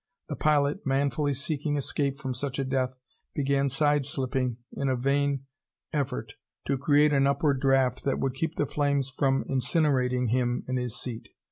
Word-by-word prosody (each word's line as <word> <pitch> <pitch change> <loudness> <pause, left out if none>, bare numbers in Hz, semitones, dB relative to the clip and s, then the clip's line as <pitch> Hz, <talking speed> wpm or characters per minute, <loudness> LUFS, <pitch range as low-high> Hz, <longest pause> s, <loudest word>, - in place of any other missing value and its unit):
The 150 - -2
pilot, 145 -1 +2
manfully 140 +1 +1
seeking 145 +1 -2
escape 140 0 -1
from 135 -3 -4
such 135 +2 -4
a 135 - 0
death, 130 -1 -1 0.4
began 140 -1 +1
side 145 +2 +2
slipping 130 -4 -1 0.2
in 140 - -1
a 130 - +2
vain 140 +1 0 0.5
effort 125 -7 -2 0.3
to 135 -1 0
create 145 +1 +4
an 140 -1 +4
upward 140 -1 +1
draft 135 -2 +2
that 135 - 0
would 135 -1 -1
keep 160 +5 -2
the 145 - +1
flames 140 -1 0
from 135 0 +1
incinerating 130 -3 +1
him 120 0 0
in 130 0 -1
his 125 -2 -3
seat. 120 -3 -5
135 Hz, 165 wpm, -27 LUFS, 130-145 Hz, 0.5 s, create